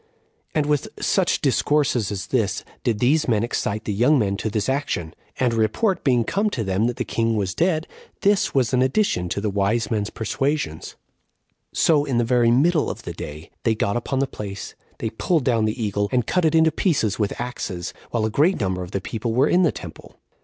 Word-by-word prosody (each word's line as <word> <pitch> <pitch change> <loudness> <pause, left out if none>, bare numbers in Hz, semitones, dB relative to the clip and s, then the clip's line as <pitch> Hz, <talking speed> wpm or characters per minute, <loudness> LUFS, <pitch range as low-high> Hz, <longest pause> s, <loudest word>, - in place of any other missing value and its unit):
3. - - +1
And 150 - +1
with 150 -1 0
such - - +1
discourses 130 -8 +1
as 100 -2 -4
this 110 -7 0 0.2
did 115 -3 +1
these 145 +8 +2
men 110 -3 +2
excite 110 -2 -2
the 105 - -1
young 125 +9 +4
men 100 -5 +1
to 110 - -2
this 105 -1 -1
action; 130 - -2 0.3
and 125 -2 +2
a - - -1
report 170 - +1
being 125 -4 +3
come 205 - 0
to 120 - -3
them 95 +3 +1
that 120 - -2
the 125 - -3
king 115 0 0
was 95 -3 -1
dead, 160 - +1 0.4
this 200 0 +3
was 130 -2 +2
an 125 - +3
addition 130 - +1
to 100 - -2
the 105 0 -1
wise 100 +5 0
men's 105 -2 0
persuasions; 135 - -2 0.8
so, 150 -3 +3
in 135 -4 -1
the 120 - +3
very 120 0 +3
middle 150 +6 +3
of - - -6
the - - -5
day, 75 +2 -8
they 115 -2 +1
got 100 -1 0
upon 120 +3 -2
the 135 - +2
place, 100 -6 -7 0.2
they 110 - -3
pulled 155 +6 0
down 115 -4 +2
the 110 +3 -2
eagle, 100 -1 -1
and 125 -3 +1
cut 180 +5 +1
it 160 0 +3
into 160 0 +5
pieces 140 - 0
with 105 -2 -1
axes, 100 -7 -4 0.2
while 115 -2 0
a 110 - -1
great 155 - +3
number 95 -3 -1
of 90 - -6
the 100 0 -3
people 115 +3 -3
were 135 +4 +4
in 180 - +3
the 170 - +4
temple. - - -10
120 Hz, 215 wpm, -23 LUFS, 105-145 Hz, 0.8 s, into